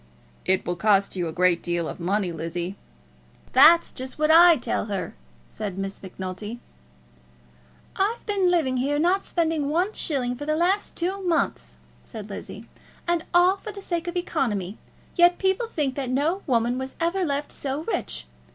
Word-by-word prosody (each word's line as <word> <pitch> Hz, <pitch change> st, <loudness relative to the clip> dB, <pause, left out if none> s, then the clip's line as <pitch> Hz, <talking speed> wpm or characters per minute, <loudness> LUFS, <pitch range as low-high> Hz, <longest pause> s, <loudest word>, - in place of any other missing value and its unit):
"It 190 Hz, 0 st, +1 dB
will 175 Hz, 0 st, -2 dB
cost 200 Hz, 0 st, +3 dB
you 175 Hz, -2 st, -1 dB
a -, -, -4 dB
great 180 Hz, 0 st, +2 dB
deal 175 Hz, -1 st, -1 dB
of -, -, -7 dB
money, 185 Hz, +1 st, 0 dB
Lizzie." 170 Hz, +3 st, -4 dB, 0.8 s
"That's 325 Hz, +6 st, +7 dB
just 260 Hz, 0 st, -7 dB
what 305 Hz, +1 st, +3 dB
I 335 Hz, 0 st, +8 dB
tell 240 Hz, -, -2 dB
her," 195 Hz, -5 st, -4 dB, 0.3 s
said 195 Hz, -, -6 dB
Miss 195 Hz, 0 st, -4 dB
Macnulty. 190 Hz, +4 st, -6 dB, 1.4 s
"I've 420 Hz, +5 st, -1 dB
been 395 Hz, -3 st, +2 dB
living 305 Hz, -8 st, +1 dB
here, 280 Hz, +3 st, 0 dB
not 360 Hz, +5 st, +2 dB
spending 320 Hz, -4 st, 0 dB
one 360 Hz, +7 st, +1 dB
shilling, 250 Hz, -5 st, -1 dB
for 290 Hz, +4 st, -7 dB
the 305 Hz, -, +1 dB
last 365 Hz, +5 st, +1 dB
two 375 Hz, +3 st, -2 dB
months," 350 Hz, -3 st, -1 dB, 0.3 s
said 215 Hz, -3 st, -9 dB
Lizzie, 210 Hz, +3 st, -8 dB, 0.4 s
"and 345 Hz, -1 st, 0 dB
all 360 Hz, +2 st, +5 dB
for 430 Hz, -, -7 dB
the 405 Hz, -, -9 dB
sake 350 Hz, -3 st, -3 dB
of 350 Hz, +1 st, -3 dB
economy; 220 Hz, -, -2 dB, 0.4 s
yet 350 Hz, 0 st, +5 dB
people 385 Hz, +5 st, +1 dB
think 295 Hz, -, -1 dB
that 265 Hz, -2 st, -3 dB
no 300 Hz, +9 st, 0 dB
woman 240 Hz, -1 st, +1 dB
was 265 Hz, 0 st, -6 dB
ever 345 Hz, +3 st, 0 dB
left 285 Hz, -2 st, -2 dB
so 280 Hz, +2 st, -4 dB
rich. 455 Hz, -, -3 dB
280 Hz, 170 wpm, -25 LUFS, -, 1.4 s, I